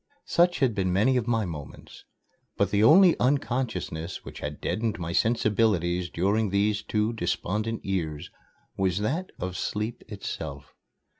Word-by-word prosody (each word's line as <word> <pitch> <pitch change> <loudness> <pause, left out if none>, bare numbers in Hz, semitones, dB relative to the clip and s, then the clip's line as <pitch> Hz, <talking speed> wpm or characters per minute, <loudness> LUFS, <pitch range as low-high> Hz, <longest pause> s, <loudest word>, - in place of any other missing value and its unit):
Such 175 -2 +2
had 130 -4 +3
been 95 -3 0
many 105 +8 +3
of 125 -2 0
my 115 -3 +1
moments. 75 -5 -9 0.5
But 100 0 +1
the 105 +1 +3
only 175 - +7
unconsciousness 120 - -1
which - - -9
had 75 0 -5
deadened 110 -1 -1
my 85 -1 -4
sensibilities 100 -5 +1
during 100 +6 +1
these 100 +2 +1
two 105 +2 0
despondent 110 +2 -2
years 85 -4 -3 0.4
was 95 -2 0
that 160 - -2
of 90 0 -4
sleep 105 +5 -3
itself. 80 -9 -6
105 Hz, 140 wpm, -27 LUFS, 90-115 Hz, 0.5 s, only